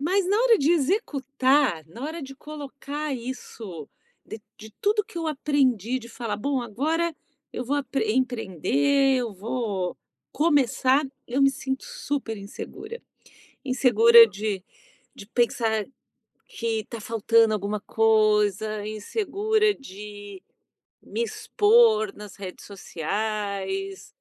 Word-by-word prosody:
Mas 365 Hz, +5 st, +1 dB
na 405 Hz, -, +3 dB
hora 470 Hz, -2 st, +5 dB
de 285 Hz, +3 st, +2 dB
executar, 280 Hz, -, +1 dB
na 175 Hz, +10 st, -11 dB
hora 315 Hz, +3 st, -4 dB
de 270 Hz, 0 st, -8 dB
colocar 290 Hz, 0 st, -6 dB
isso 230 Hz, -, -7 dB, 0.4 s
de 220 Hz, -, -8 dB, 0.2 s
de 220 Hz, 0 st, -11 dB
tudo 420 Hz, +1 st, +3 dB
que 445 Hz, -4 st, -15 dB
eu 330 Hz, -, -3 dB
aprendi, 265 Hz, -6 st, +1 dB
de 235 Hz, -2 st, -11 dB
falar: 230 Hz, -2 st, -4 dB
"Bom, 270 Hz, +4 st, -1 dB
agora 315 Hz, +9 st, -1 dB, 0.4 s
eu -, -, -3 dB
vou 280 Hz, +4 st, 0 dB
apre 270 Hz, -5 st, -1 dB
empreender, 255 Hz, -, +2 dB
eu 235 Hz, -5 st, -3 dB
vou 200 Hz, -3 st, -3 dB, 0.4 s
começar", 285 Hz, -2 st, +3 dB, 0.2 s
eu 265 Hz, +3 st, +1 dB
me 275 Hz, -, +6 dB
sinto 265 Hz, 0 st, -4 dB
super 290 Hz, -, -4 dB
insegura. 425 Hz, -, -8 dB, 0.6 s
Insegura 235 Hz, -3 st, +7 dB
de 205 Hz, -2 st, -3 dB, 0.5 s
de 200 Hz, -, -10 dB
pensar 225 Hz, -2 st, +1 dB, 0.6 s
que 225 Hz, -2 st, -3 dB
tá 230 Hz, -, -5 dB
faltando 225 Hz, -1 st, +3 dB
alguma 210 Hz, 0 st, -2 dB
coisa, 215 Hz, -1 st, +2 dB
insegura 420 Hz, -, 0 dB
de 205 Hz, -, -10 dB, 0.6 s
me 470 Hz, -, -3 dB
expor 440 Hz, -2 st, +3 dB
nas 210 Hz, -2 st, -10 dB
redes 190 Hz, -2 st, -9 dB
sociais 210 Hz, -, -3 dB
250 Hz, 120 wpm, -25 LUFS, 215-295 Hz, 0.6 s, Insegura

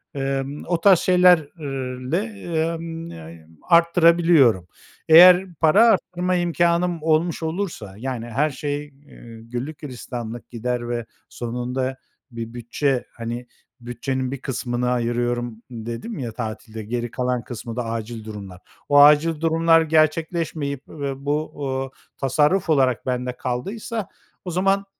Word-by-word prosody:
Emm, 135 Hz, +1 st, -3 dB
o 170 Hz, -2 st, 0 dB
tarz 190 Hz, -2 st, +6 dB
şeylerle, 150 Hz, -6 st, +2 dB
emm, 165 Hz, -5 st, -3 dB
ne 80 Hz, 0 st, -11 dB, 0.2 s
arttırabiliyorum? 170 Hz, -, +5 dB, 0.4 s
Eğer 180 Hz, +2 st, +8 dB
para 165 Hz, +10 st, +5 dB
arttırma 180 Hz, -4 st, +1 dB
imkânım 175 Hz, -1 st, +1 dB
olmuş 160 Hz, +1 st, +1 dB
olursa, 160 Hz, -, -4 dB
yani 125 Hz, -1 st, -4 dB
her 135 Hz, +7 st, +1 dB
şey, 145 Hz, +1 st, -3 dB
eee, 135 Hz, -5 st, -15 dB
güllük 125 Hz, +6 st, -5 dB
gülistanlık 120 Hz, -4 st, -7 dB
gider 120 Hz, 0 st, -3 dB
ve 120 Hz, -1 st, -2 dB, 0.2 s
sonunda 125 Hz, +2 st, -3 dB, 0.3 s
bir 115 Hz, 0 st, -6 dB
bütçe, 120 Hz, +2 st, -1 dB
hani 120 Hz, +1 st, -6 dB, 0.3 s
bütçenin 125 Hz, +2 st, -3 dB
bir 140 Hz, -, -6 dB
kısmını 125 Hz, -1 st, -2 dB
ayırıyorum 120 Hz, -1 st, -1 dB
dedim 120 Hz, -, -6 dB
ya 120 Hz, -3 st, -4 dB
tatilde, 110 Hz, -1 st, -6 dB
geri 120 Hz, +1 st, -3 dB
kalan 125 Hz, 0 st, -1 dB
kısmı 115 Hz, -1 st, -7 dB
da 125 Hz, -1 st, -2 dB
acil 115 Hz, 0 st, -5 dB
durumlar. 100 Hz, -4 st, -8 dB, 0.3 s
O 145 Hz, 0 st, +6 dB
acil 150 Hz, +2 st, +5 dB
durumlar 165 Hz, 0 st, +4 dB
gerçekleşmeyip 155 Hz, -2 st, 0 dB
ve 140 Hz, -2 st, -5 dB
bu, 150 Hz, +2 st, -1 dB, 0.3 s
ııı, 135 Hz, -, -8 dB, 0.3 s
tasarruf 150 Hz, +7 st, +2 dB
olarak 130 Hz, -6 st, +2 dB
bende 125 Hz, -1 st, -2 dB
kaldıysa 200 Hz, -, -4 dB, 0.4 s
o 180 Hz, -, -4 dB
zaman 195 Hz, +3 st, +1 dB
135 Hz, 120 wpm, -22 LUFS, 120-165 Hz, 0.4 s, Eğer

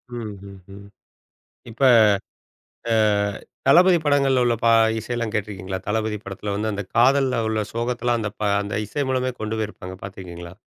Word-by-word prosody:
ம்ஹ்ம். 100 Hz, -3 st, -9 dB, 0.8 s
இப்ப 115 Hz, -, -13 dB, 1.1 s
அ -, -, +3 dB, 0.7 s
தளபதி 180 Hz, +1 st, +6 dB
படங்கள்ல 140 Hz, -3 st, +3 dB
உள்ள 120 Hz, -1 st, +2 dB
பா 115 Hz, -, +5 dB, 0.3 s
இசையெல்லாம் 115 Hz, 0 st, -3 dB
கேட்டிருக்கீங்களா? 95 Hz, -3 st, -4 dB
தளபதி 110 Hz, 0 st, -1 dB
படத்துல 100 Hz, +1 st, -5 dB
வந்து 110 Hz, +2 st, -2 dB
அந்தக் 100 Hz, -2 st, -6 dB
காதல்ல 130 Hz, +1 st, +3 dB
உள்ள 110 Hz, 0 st, -1 dB
சோகத்தலாம், 120 Hz, +1 st, -1 dB
அந்தப் 105 Hz, -1 st, -5 dB
பா 105 Hz, -, +1 dB
அந்த 100 Hz, 0 st, -4 dB
இசை 145 Hz, +7 st, -2 dB
மூலமே 130 Hz, 0 st, 0 dB
கொண்டு 110 Hz, +1 st, -3 dB
போயிருப்பாங்க. 100 Hz, -4 st, -6 dB
பாத்திருக்கீங்களா? 90 Hz, -2 st, -9 dB
110 Hz, 135 wpm, -22 LUFS, 100-120 Hz, 1.1 s, தளபதி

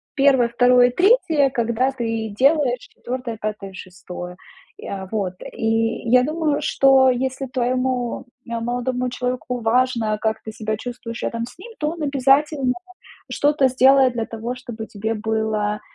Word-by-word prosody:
1, 270 Hz, -4 st, +4 dB
2, 245 Hz, 0 st, +4 dB
3, 330 Hz, -, +3 dB
когда 235 Hz, +1 st, 0 dB
ты 225 Hz, -3 st, -3 dB
делаешь 275 Hz, -3 st, +3 dB
4, 245 Hz, -3 st, -6 dB
5, 210 Hz, -2 st, -5 dB
6. 180 Hz, -1 st, -9 dB, 0.4 s
И, -, -, -11 dB
а, 190 Hz, -1 st, -5 dB
вот. 195 Hz, -4 st, -2 dB, 0.2 s
И 225 Hz, +1 st, -1 dB
я 250 Hz, 0 st, +6 dB
думаю, 305 Hz, 0 st, -1 dB
что 270 Hz, -1 st, +4 dB
если 260 Hz, +2 st, -1 dB
твоему, 255 Hz, -1 st, -1 dB, 0.3 s
а, 230 Hz, -, -2 dB
молодому 245 Hz, +1 st, -2 dB
человеку 250 Hz, 0 st, -3 dB
важно, 230 Hz, -2 st, +1 dB
как 220 Hz, 0 st, -1 dB
ты 220 Hz, -, -7 dB
себя 215 Hz, 0 st, -3 dB
чувствуешь 235 Hz, -1 st, -7 dB
рядом 230 Hz, 0 st, -2 dB
с 245 Hz, -, -14 dB
ним, 460 Hz, +7 st, -11 dB
то 300 Hz, 0 st, 0 dB
он 335 Hz, 0 st, -8 dB
обязательно 275 Hz, -1 st, +2 dB, 0.6 s
что-то 285 Hz, -2 st, +2 dB
сделает 260 Hz, 0 st, +5 dB
для 230 Hz, -2 st, -3 dB
того, 230 Hz, +2 st, -5 dB
чтобы 235 Hz, -3 st, -8 dB
тебе 220 Hz, +2 st, -3 dB
было 215 Hz, -1 st, -1 dB
245 Hz, 145 wpm, -21 LUFS, 225-265 Hz, 0.6 s, я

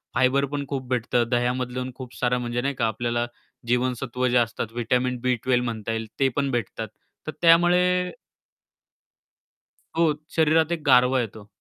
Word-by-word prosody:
Fibre 130 Hz, +2 st, +3 dB
पण 145 Hz, -1 st, -2 dB
खूप 130 Hz, -2 st, -4 dB
भेटतं. 120 Hz, -1 st, +1 dB
दह्यामधल्या 125 Hz, +1 st, -1 dB
खूप 130 Hz, -2 st, -9 dB
सारं 125 Hz, 0 st, +1 dB
म्हणजे 120 Hz, 0 st, -2 dB
नाही 140 Hz, +2 st, -1 dB
का 115 Hz, -, +1 dB
आपल्याला 120 Hz, +2 st, -1 dB, 0.4 s
जीवनसत्व 125 Hz, +1 st, 0 dB
जे 125 Hz, 0 st, +3 dB
असतात 115 Hz, -1 st, 0 dB
व्हिटॅमिन 125 Hz, +2 st, 0 dB
बी 125 Hz, 0 st, +2 dB
12 125 Hz, -1 st, +2 dB
म्हणता 115 Hz, -2 st, -3 dB
येईल 110 Hz, 0 st, -3 dB
ते 135 Hz, -, +4 dB
पण 140 Hz, -1 st, 0 dB
भेटतात 115 Hz, -2 st, -3 dB, 0.4 s
तर -, -, -2 dB
त्यामुळे 180 Hz, +2 st, +4 dB, 1.9 s
हो, 165 Hz, -2 st, +4 dB, 0.2 s
शरीरात 160 Hz, 0 st, +3 dB
एक 170 Hz, -2 st, -1 dB
गारवा 125 Hz, +1 st, +5 dB
येतो. 110 Hz, -2 st, -7 dB
125 Hz, 150 wpm, -24 LUFS, 120-140 Hz, 1.9 s, गारवा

